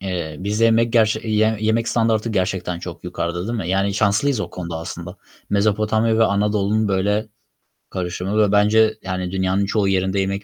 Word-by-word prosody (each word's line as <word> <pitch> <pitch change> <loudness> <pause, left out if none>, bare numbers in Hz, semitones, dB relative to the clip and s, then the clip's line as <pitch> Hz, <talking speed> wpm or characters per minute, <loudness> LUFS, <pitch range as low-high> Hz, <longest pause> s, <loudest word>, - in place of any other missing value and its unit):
eee, 90 -5 -4
bizde 105 +4 0
yemek 115 0 +3
gerç 110 -2 +3
yiyen, 110 0 +2
yemek 110 +2 0
standardı 115 -1 +1
gerçekten 90 -3 -1
çok 85 -1 -9
yukarıda, 85 +1 -3
değil 120 0 -2
mi? 90 -4 -4
Yani 100 +1 +1
şanslıyız 110 +5 +1
o 90 -4 -4
konuda 85 -2 -6
aslında. 85 +3 -7 0.3
Mezopotamya 110 +2 +1
ve 115 - +5
Anadolu'nun 105 +1 +1
böyle 105 +3 0 0.6
karışımı 90 +2 -3
ve 105 -2 +3
bence, 110 +1 +3
yani, 90 -1 -4
dünyanın 95 +1 0
çoğu 100 0 0
yerinde 95 0 +1
yemek 100 +1 -2
100 Hz, 165 wpm, -21 LUFS, 95-110 Hz, 0.6 s, ve